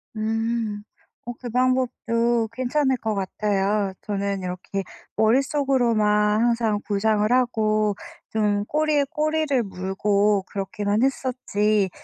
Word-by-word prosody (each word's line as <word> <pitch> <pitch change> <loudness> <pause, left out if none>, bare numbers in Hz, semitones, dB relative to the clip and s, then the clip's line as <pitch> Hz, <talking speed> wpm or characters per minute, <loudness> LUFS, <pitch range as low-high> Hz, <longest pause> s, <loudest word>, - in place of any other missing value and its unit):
음. 220 -1 -2 0.4
어 240 - -4
그 245 - -6
방법도 240 -2 +1
괜찮을 260 +2 0
것 220 -2 -2
같아요. 200 0 0
저는 200 -1 -2
이렇게 185 +2 -4 0.3
머릿속으로만 225 -4 +2
항상 230 -3 +1
구상을 210 +1 +1
하고 215 -4 +2 0.3
좀 205 -2 0
꼬리에 300 +1 +1
꼬리를 305 -4 0
물고 200 +1 0
그렇게만 205 +2 -1
했었지 215 -6 +1
220 Hz, 235 characters per minute, -23 LUFS, 205-250 Hz, 0.4 s, 머릿속으로만